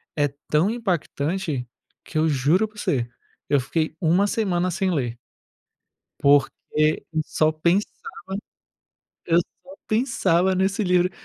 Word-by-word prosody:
é 145 -1 +2 0.2
tão 155 +7 +3
impactante 170 - -2 0.4
que 155 - -6
eu 160 +1 +3
juro 150 +9 +2
pra 210 0 -21
você, 120 -10 -1 0.4
eu 145 - +4
fiquei 155 +5 -1
uma 180 +4 +3
semana 185 -4 0
sem 190 +2 0
ler 120 -8 -2 1.0
porque 140 0 +5 0.6
eu 155 -1 0
só 155 0 +1
pensava 170 +6 +1 1.3
eu 170 0 +4
só 180 +2 -6
pensava 190 -6 +2
nesse 190 +3 +1
livro. 180 0 +3
175 Hz, 125 wpm, -23 LUFS, 150-190 Hz, 1.3 s, porque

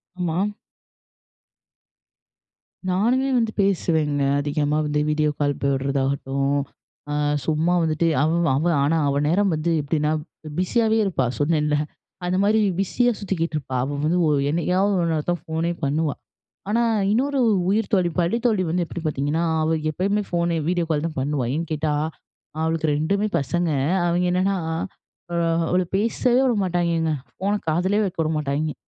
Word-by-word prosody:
ஆமா. 175 -2 -1 2.5
நானுமே 240 +9 +2
வந்து 225 -2 +1
பேசுவேங்க, 160 -7 +1 0.2
அதிகமா 145 +1 0
வந்து 150 0 0
வீடியோ 150 0 +2
கால் 145 -1 +1
போடுறதாகட்டும், 140 0 0 0.5
அ - - -1 0.3
சும்மா 160 +3 +1
வந்துட்டு 160 +1 +1 0.2
அவ 155 - +2 0.2
அவ, 145 +5 0 0.2
ஆனா 160 +3 +2
அவ 140 - +1
நேரம் 195 +4 +2
வந்து 155 +2 -1
எப்படின்னா 150 +1 0 0.3
ப் 150 - -7
பிஸியாவே 220 +4 +2
இருப்பா 160 -9 0
சொன்னேன்ல. 150 0 +1 0.5
அந்தமாரி 200 +4 +2 0.2
பிஸியா 245 +5 +2
சுத்திக்கிட்டு 170 -5 -2
இருப்பா. 130 -3 -4
அவ 140 +1 -3
வந்து 170 +3 +2
ஓ - - +3 0.2
என்னைக்காவது 180 +5 +1
ஒரு 170 - +1
நேரம் 155 -2 -2
தான் 175 -3 -2
ஃபோனே 165 +2 -1
பண்ணுவா. 150 +2 0 0.6
ஆனா, 235 +2 +2 0.3
இன்னொரு 275 +5 +1
உ - - +4 0.2
உயிர்த்தோழி 200 -4 +1
பள்ளி 175 +6 +2
தோழி 210 -5 +2
வந்து 175 0 +1
எப்படி 175 - -6
பாத்தீங்கன்னா, 150 +3 0 0.2
அவ 160 +1 +1
எப்பயுமே 200 +6 0
ஃபோன், 170 0 0 0.2
வீடியோ 175 -2 0
கால் 150 -1 0
தான் 155 -4 -5
பண்ணுவா. 140 -1 -1
ஏன்னு 165 +3 -2
கேட்டா, 155 0 -1 0.7
அவளுக்கு 160 0 0
2மே 200 +7 0
பசங்க. 170 +5 -1 0.4
அவிங்க 175 +1 +1
என்னன்னா, 190 +2 +1 0.8
அ - - -2 0.3
அவள 180 +1 +2
பேசவே 240 +4 +2
விடமாட்டாய்ங்கங்க. 175 -7 +1 0.2
ஃபோன 200 +2 0
காதுலேயே 185 +6 +2
வைக்க 190 -2 -4
விடமாட்டாய்ங்க. 150 -1 -1
165 Hz, 140 wpm, -23 LUFS, 150-190 Hz, 2.5 s, உ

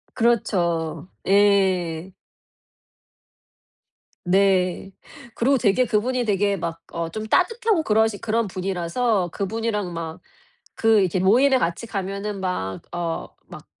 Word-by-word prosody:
그렇죠. 175 - 0 0.2
예. 190 -3 +2 2.1
네. 190 0 +2 0.4
그리고 270 +3 +2
되게 235 +3 +3
그분이 245 +3 0
되게 200 -1 +1
막 165 -1 -5
어 170 -1 -3
좀 215 +4 -5
따뜻하고 415 - +2
그러신 220 -1 +2
그런 225 0 0
분이라서 185 +2 -1
그분이랑 210 -2 -2
막 165 -1 -6 0.6
그 225 -2 +5
이렇게 185 0 0
모임에 255 +8 +4
같이 170 +1 -2
가면은 200 0 -4
막 95 - -3
어, 170 -1 -3 0.2
막 - - -12
195 Hz, 220 characters per minute, -23 LUFS, 175-225 Hz, 2.1 s, 그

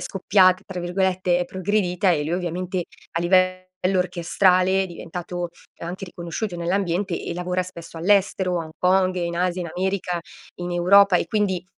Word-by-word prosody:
"scoppiata", 185 -1 +3
tra 185 -2 -5
virgolette, 180 0 +1
è 180 - 0
progredita 185 0 0
e 150 -3 +1
lui 160 - -3
ovviamente 180 +1 -2 0.3
a 165 - -1
livello 185 +1 +3 0.4
orchestrale 180 +2 +2
è - - -3
diventato 175 0 -6 0.3
anche 180 +3 -6
riconosciuto 175 +3 -5
nell'ambiente 180 +1 -1
e - - -4
lavora 180 +1 -1
spesso 170 -2 -11
all'estero, 190 -1 +2
a - - -5
Hong 160 - -12
Kong, 185 0 +3
in 170 -1 -2
Asia, 180 +1 0
in 170 - -4
America, 185 -1 -1 0.4
in 175 0 -4
Europa 185 +2 +5
e 175 - -1
quindi 200 -4 0
180 Hz, 160 wpm, -23 LUFS, 175-190 Hz, 0.4 s, Europa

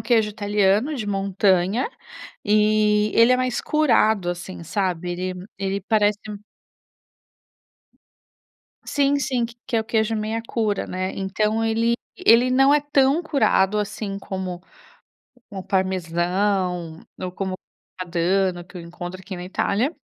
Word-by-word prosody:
queijo 220 -3 +2
italiano 205 +5 +1
de 220 -7 -4
montanha, 195 - +1 0.6
e 210 0 +3
ele 230 +2 +6
é - - +4
mais 255 -1 -1
curado 220 -11 +2
assim 175 0 -7
sabe 180 0 -2
ele 180 +1 -5
ele 195 0 -2
parece 210 0 +2
um 205 - -6 2.5
sim 285 0 +2
sim 255 -4 0
que 230 - -14
que 235 - -1
é - - +3
o 220 - -5
queijo 225 -1 0
meia 220 +1 -2
cura, 215 -4 -1
né. 185 +1 -3
Então, 210 +3 -1
ele 225 +1 +2 0.2
ele 235 +3 +5
não 270 +2 +5
é 295 - +4
tão 285 +1 +2
curado 215 - +2
assim 205 -1 -4
como 185 -2 -5 0.9
como 195 -3 -6
o - - -8
parmesão, 180 -1 -1 0.2
ou 185 - -3
como 190 +1 -3
o 185 - -4 0.4
grana 185 -1 -6
padano 175 +1 +1
que, 180 +1 -14
eu - - -6
encontro 175 +2 -8
aqui 190 0 -8
na 175 - -7
Itália, 220 - 0
205 Hz, 145 wpm, -23 LUFS, 185-225 Hz, 2.5 s, ele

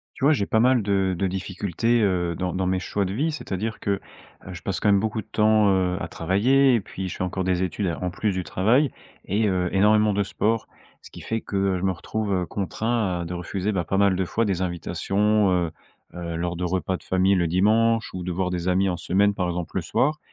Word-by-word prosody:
Tu 135 - -3
vois, 150 - +6
j'ai 100 -9 0
pas 110 - +1
mal 125 0 +4
de 95 -2 +1
de 95 - 0
difficultés, 95 +5 -1
heu, 90 -4 +1
dans 90 0 -2
dans 95 +1 -1
mes 95 0 0
choix 100 +3 -1
de 95 - -3
vie, 150 +8 0
c'est-à-dire 110 - -4
que, 100 - -1 0.5
heu, 95 - -7
je 85 -2 -9
passe 95 0 -3
quand - - +1
même 100 -1 +5
beaucoup 110 +1 -2
de - - -29
temps, 110 -1 +4
heu, 90 -1 +1
à - - -4
travailler 125 +10 +3
et 115 - +2
puis 95 -1 -6
je - - -6
fais - - -4
encore 95 +1 -2
des 90 0 +1
études 95 +2 -2
alors 85 -1 -3
en 90 - -1
plus 105 +3 -1
du 95 - -2
travail 120 - +2 0.4
et, 105 +3 +1
heu, 90 -2 0
énormément 105 +2 +4
de 100 +1 +1
sport. 110 +3 -1 0.4
Ce - - -14
qui - - -10
fait 115 0 -3
que, 100 - -5
heu, 95 -1 +1
je 90 - -4
me 95 - +2
retrouve, 105 +3 -3
heu, 90 -2 0
contraint 100 -1 -1
de 85 +2 -5
refuser, 95 +3 -3
bah, 95 -4 -1
pas 95 - -1
mal 100 -2 +3
de 95 - 0
fois 115 +6 0
des 95 -4 -1
invitations, 95 +3 +1
heu, 85 -2 +1 0.4
heu, 85 -1 -5
lors 85 0 -2
de 90 - -3
repas 95 +1 -1
de - - -16
famille 95 +1 +2
le 85 - +2
dimanche 110 +6 +2
ou 90 -1 -5
de 90 - -3
voir 90 +1 -1
des 90 -1 -3
amis 95 +1 +2
en 90 - -1
semaine 100 +4 +2
par 90 - -1
exemple 90 0 -4
le 95 - 0
soir. 150 - 0
95 Hz, 250 wpm, -24 LUFS, 90-105 Hz, 0.5 s, vois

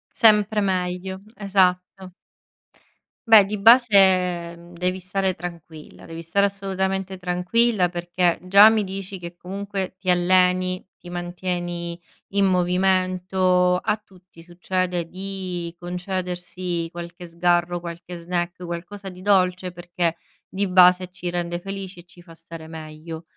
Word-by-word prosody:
Sempre 210 -1 +4
meglio, 190 0 -2
esatto. 185 -2 0 1.1
Beh, 220 -3 +8
di 210 +2 -4
base, 190 -6 +5
mhmm, 170 +1 -15
devi 180 +2 -2
stare 190 +1 -1
tranquilla. 165 -3 -10
Devi 165 0 -8
stare 200 +5 +2
assolutamente 195 -1 -3
tranquilla, 180 +3 +1
perché 175 0 0
già 200 +4 +7
mi 220 -1 +1
dici 195 0 -6
che, 175 -1 -9
comunque, 195 0 -5
ti 185 -1 -4
alleni, 185 +1 +2
ti 175 - -12
mantieni 175 -1 -4 0.4
in 200 0 +3
movimento. 185 0 +2
A 180 - 0
tutti 185 -5 -19
succede 180 0 -2
di 185 -2 -5
concedersi 180 -1 -4
qualche 175 +1 -8
sgarro, 175 +1 +1
qualche 170 +1 -8
snack, 175 +1 -3
qualcosa 180 +4 -7
di 185 -1 -9
dolce, 185 -2 +2
perché 175 -1 -2 0.3
di 200 +1 -1
base 180 0 +5
ci 180 -1 -6
rende 175 0 -3
felici 195 -2 -7
e - - -12
ci 175 0 -18
fa 170 -1 -15
stare 165 -1 -11
meglio. 160 +1 -9
180 Hz, 125 wpm, -23 LUFS, 175-190 Hz, 1.1 s, Beh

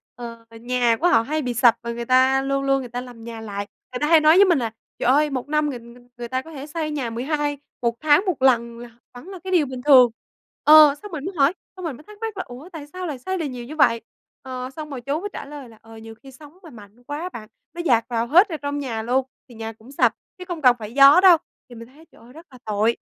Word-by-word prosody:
ờ, 230 -1 -9 0.2
nhà 240 -1 +1
của 350 - +4
họ 340 -10 +4
hay 305 +7 -2
bị 250 -3 -3
sập 235 0 +4
và 235 0 -5
người 235 0 -5
ta 260 +2 +3
luôn 275 0 -1
luôn 275 0 +2
người 250 -2 -7
ta 245 +1 -5
làm 245 -2 -12
nhà 230 -1 -8
lại. 205 -2 -6 0.3
Người 250 - -4
ta 295 - 0
hay 325 0 +6
nói 310 +1 +5
với 395 +2 +7
mình 345 -6 +3
là 230 -3 -3 0.3
"Trời - - -1
ơi 295 +3 +3
1 260 -2 -4
năm 300 0 0
người 255 -4 -6
người 235 +1 -16
người 240 0 -6
ta 260 +2 -2
có 320 - -14
thể 285 -2 -8
xây 310 0 -4
nhà 275 -6 -3
mười 230 +2 -5
hai 295 0 -1 0.2
1 235 -1 0
tháng 310 +5 +4
1 360 -8 -2
lần 235 -3 +2
là 240 0 -10 0.2
vẫn 245 +7 -12
là 380 -2 -9
cái 375 - -5
điều 345 -5 +3
bình 255 -2 -7
thường." 255 -4 +6 0.5
Ờ, 305 -2 +8
xong 415 - -10
mình 305 -3 -6
mới 380 - -4
hỏi, 280 +3 +4 0.2
xong 370 -1 -8
mình 305 -6 -4
mới 300 - -16
thắc 420 +5 -15
mắc 445 -3 -5
là 375 - -3
"Ủa, 260 +8 -11
tại 320 -5 -10
sao 365 +4 -7
lại 290 -5 -5
xây 375 +9 -3
được 330 - -3
nhiều 250 -4 -6
như 300 +5 -9
vậy?" 235 -6 +3 0.4
Ờ, 255 -1 -6
xong 310 -1 -7
rồi 270 -4 -7
chú 280 +5 -2
mới 410 +4 -5
trả - - -7
lời 280 -3 -10
là, 225 - -17
ờ, 225 0 -14
nhiều 225 0 -11
khi 270 - -13
sóng 295 +5 -16
mà 330 - -12
mạnh 220 -1 -16
quá 290 +4 -6
á 360 - -4
bạn, 215 -10 -10 0.2
nó 345 - -5
dạt 240 -9 +2
vào 235 -1 -1
hết 360 - +5
ở 320 - -4
trong 285 0 -4
nhà 235 -6 -4
luôn, 250 +3 0 0.2
thì 240 - -14
nhà 225 0 -6
cũng 225 +4 -17
sập 280 - +2 0.2
chứ 365 - -9
không 345 -3 -5
cần 250 -3 +5
phải 215 0 -8
gió 275 +4 +8
đâu, 370 -3 +7 0.3
thì 240 - -12
mình 230 0 -11
thấy 295 +6 -19
trời - - -21
ơi 240 +2 -17
rất 325 +3 -14
là 255 - -14
tội. 215 +2 0
270 Hz, 290 wpm, -22 LUFS, 235-305 Hz, 0.5 s, Ờ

